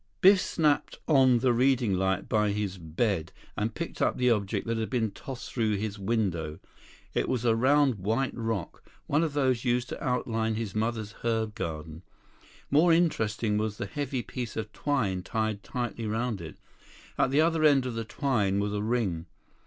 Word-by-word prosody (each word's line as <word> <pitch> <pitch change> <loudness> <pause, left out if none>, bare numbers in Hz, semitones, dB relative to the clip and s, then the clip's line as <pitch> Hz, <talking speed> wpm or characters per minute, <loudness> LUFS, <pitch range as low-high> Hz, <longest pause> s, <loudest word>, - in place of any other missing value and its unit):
Biff 190 0 +7
snapped 150 -3 +1
on 130 -5 +5
the 125 -1 +3
reading 125 -3 +3
light 95 0 0
by 105 -1 +2
his 100 -3 -3
bed 85 +2 -1 0.2
and 110 +1 -2
picked 170 - -5
up - - +2
the 125 -1 +3
object 100 -4 0
that 115 -1 -1
had 110 - -2
been 115 -5 0
tossed 130 +5 -8
through 110 -4 +1
his 105 0 -3
window. 95 -7 -1 0.6
It - - 0
was 125 -2 -1
a 115 -1 +4
round 135 -1 +3
white 115 +8 0
rock, 115 -6 -3 0.2
one 150 +2 +2
of 160 -3 0
those 130 -5 +1
used 125 0 0
to - - -6
outline 115 -3 0
his 110 -3 -3
mother's 110 -1 -2
herb 110 -2 0
garden. 80 -3 -5 0.7
More 160 +5 +5
interesting 110 -10 +1
was 105 -1 -2
the - - -3
heavy 140 -4 -3
piece 120 +1 -5
of 110 -1 -4
twine 110 -11 0
tied 110 +1 -2
tightly 120 -1 -4
around 110 -2 -1
it. 80 - -9 0.6
At - - +2
the 140 +3 +3
other 165 -1 +2
end 140 -4 +5
of 125 - -3
the 115 0 -3
twine 110 -5 0
was 100 0 -1
a 105 - -1
ring. 105 -7 -1
115 Hz, 180 wpm, -28 LUFS, 105-130 Hz, 0.7 s, Biff